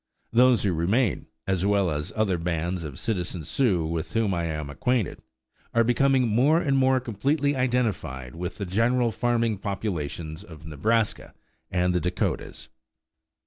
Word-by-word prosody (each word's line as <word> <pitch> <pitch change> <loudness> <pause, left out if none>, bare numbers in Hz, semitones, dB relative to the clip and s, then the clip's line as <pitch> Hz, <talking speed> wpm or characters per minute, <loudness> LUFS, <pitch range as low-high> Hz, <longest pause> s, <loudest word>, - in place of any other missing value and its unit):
Those 125 0 +5
who 95 -3 +1
remain, 100 +7 +1 0.2
as 95 -2 0
well 100 -3 +2
as 75 0 -3
other 100 -5 +1
bands 85 +1 -2
of 70 -4 -7
citizen 90 -6 -2
Sioux 95 - +1
with 80 +1 -3
whom 110 -4 +1
I 85 -1 -1
am 75 -3 -3
acquainted, 125 - -1 0.5
are 115 - +5
becoming 130 +2 +3
more 130 +9 +4
and 140 -4 +1
more 130 -1 +4
completely 140 +5 0
identified 115 - -1
with 90 +3 -5
the 100 - -3
general 115 +5 +2
farming 115 -3 0
population 85 -6 -4
of 80 -2 -12
Nebraska 105 +9 -1 0.3
and 90 0 +1
the 90 - +1
Dakotas. 90 +2 -2
100 Hz, 145 wpm, -26 LUFS, 85-120 Hz, 0.5 s, Those